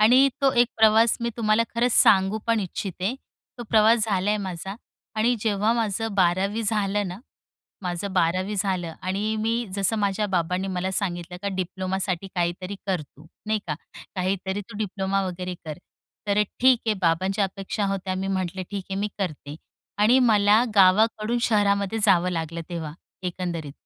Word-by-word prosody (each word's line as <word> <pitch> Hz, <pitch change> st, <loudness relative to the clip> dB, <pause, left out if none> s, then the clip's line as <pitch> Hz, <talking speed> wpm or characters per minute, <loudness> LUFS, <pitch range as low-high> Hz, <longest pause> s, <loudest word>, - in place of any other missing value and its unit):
आणि 255 Hz, +6 st, +6 dB
तो 275 Hz, -1 st, +4 dB
एक 240 Hz, 0 st, +4 dB
प्रवास 220 Hz, +1 st, +5 dB
मी 235 Hz, 0 st, -1 dB
तुम्हाला 215 Hz, -1 st, +3 dB
खरंच 240 Hz, +1 st, +2 dB
सांगू 195 Hz, 0 st, +5 dB
पण 230 Hz, -1 st, +2 dB
इच्छिते. 190 Hz, +2 st, -3 dB, 0.4 s
तो -, -, -4 dB
प्रवास 220 Hz, 0 st, +5 dB
झालाय 200 Hz, -2 st, 0 dB
आहे 210 Hz, -, -3 dB
माझा 190 Hz, +1 st, -5 dB, 0.4 s
आणि 225 Hz, +3 st, +2 dB
जेव्हा 215 Hz, 0 st, +1 dB
माझं 225 Hz, -2 st, -1 dB
12वी 195 Hz, +4 st, +1 dB
झालं 205 Hz, -2 st, 0 dB
ना 180 Hz, +2 st, -7 dB, 0.6 s
माझं 180 Hz, +2 st, -3 dB
12वी 185 Hz, +3 st, +1 dB
झालं 185 Hz, -4 st, -1 dB
आणि 200 Hz, +4 st, -1 dB
मी 225 Hz, +2 st, 0 dB
जसं 200 Hz, +3 st, +1 dB
माझ्या 205 Hz, +1 st, 0 dB
बाबांनी 180 Hz, +2 st, 0 dB
मला 185 Hz, +1 st, -1 dB
सांगितलं 180 Hz, -2 st, -3 dB
का 200 Hz, -, -1 dB
"डिप्लोमासाठी 185 Hz, 0 st, -2 dB
काहीतरी 180 Hz, +2 st, -2 dB
कर 185 Hz, -4 st, 0 dB
तू." 145 Hz, +1 st, -18 dB, 0.2 s
नाही 215 Hz, 0 st, +1 dB
का? 150 Hz, -, -1 dB, 0.4 s
"काहीतरी 190 Hz, +1 st, -2 dB
तू 205 Hz, +1 st, -11 dB
डिप्लोमा 195 Hz, -1 st, -1 dB
वगैरे 180 Hz, 0 st, -4 dB
कर." 155 Hz, -2 st, -6 dB, 0.5 s
तर 200 Hz, 0 st, +1 dB
अ, -, -, +6 dB, 0.2 s
ठीक 255 Hz, 0 st, +6 dB
आहे 220 Hz, -, +2 dB
बाबांच्या 185 Hz, +4 st, +1 dB
अपेक्षा 195 Hz, +2 st, -3 dB
होत्या. 195 Hz, -1 st, -2 dB
मी 190 Hz, +1 st, -3 dB
म्हटलं, 190 Hz, -1 st, -2 dB
"ठीक 200 Hz, -2 st, -4 dB
आहे 195 Hz, -, -2 dB
मी 210 Hz, -, 0 dB
करते." 155 Hz, -6 st, -4 dB, 0.4 s
आणि 220 Hz, +5 st, +5 dB
मला 215 Hz, -2 st, +4 dB
गावाकडून 215 Hz, +4 st, +4 dB
शहरामध्ये 205 Hz, -1 st, +2 dB
जावं 180 Hz, -3 st, +4 dB
लागलं 165 Hz, -1 st, -3 dB
तेव्हा, 165 Hz, -4 st, -5 dB, 0.3 s
एकंदरीत. 175 Hz, -5 st, -4 dB
195 Hz, 160 wpm, -24 LUFS, 185-215 Hz, 0.6 s, आणि